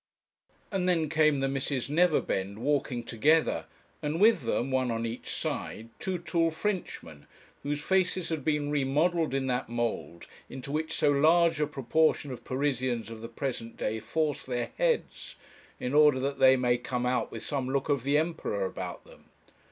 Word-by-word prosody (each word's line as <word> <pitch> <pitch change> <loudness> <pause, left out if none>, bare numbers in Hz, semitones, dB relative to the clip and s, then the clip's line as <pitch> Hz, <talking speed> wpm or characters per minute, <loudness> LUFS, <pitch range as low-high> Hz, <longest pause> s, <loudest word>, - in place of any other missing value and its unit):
And 185 -2 0
then 165 -4 +1
came 155 -3 +3
the 135 - +1
Misses 135 -1 -2
Neverbend 145 - +1
walking 130 -1 -1
together, 150 +9 +2 0.4
and 150 +2 -2
with 215 -3 +5
them, 130 +4 0
one 130 -1 +1
on 115 0 -1
each 115 +1 -5
side, 115 +1 -4
two 185 -1 -2
tall 170 -1 +1
Frenchmen, 160 - -4 0.3
whose 145 +1 -2
faces 185 +1 +1
had 160 -4 -3
been 150 -1 0
remodelled 150 +2 +1
in 135 -1 0
that 125 -1 -1
mould 115 -7 -3 0.2
into 135 +1 -7
which 155 +2 -2
so 145 - +3
large 165 +3 +4
a 150 - +2
proportion 150 +1 +1
of 125 - -8
Parisians 130 -4 -1
of 110 -1 -8
the 115 - -7
present 115 -2 -4
day 110 +1 -2
force 155 +4 -1
their 120 -2 -3
heads, - - -1 0.4
in 125 - -3
order 150 -3 +6
that 140 +1 -2
they 130 0 +7
may 125 -1 +2
come 125 0 -3
out 125 0 0
with - - -6
some 135 -3 -2
look 135 0 0
of 140 -3 +1
the 140 +4 +2
Emperor 155 - -1
about - - -6
them. - - -18
140 Hz, 170 wpm, -29 LUFS, 125-160 Hz, 0.4 s, they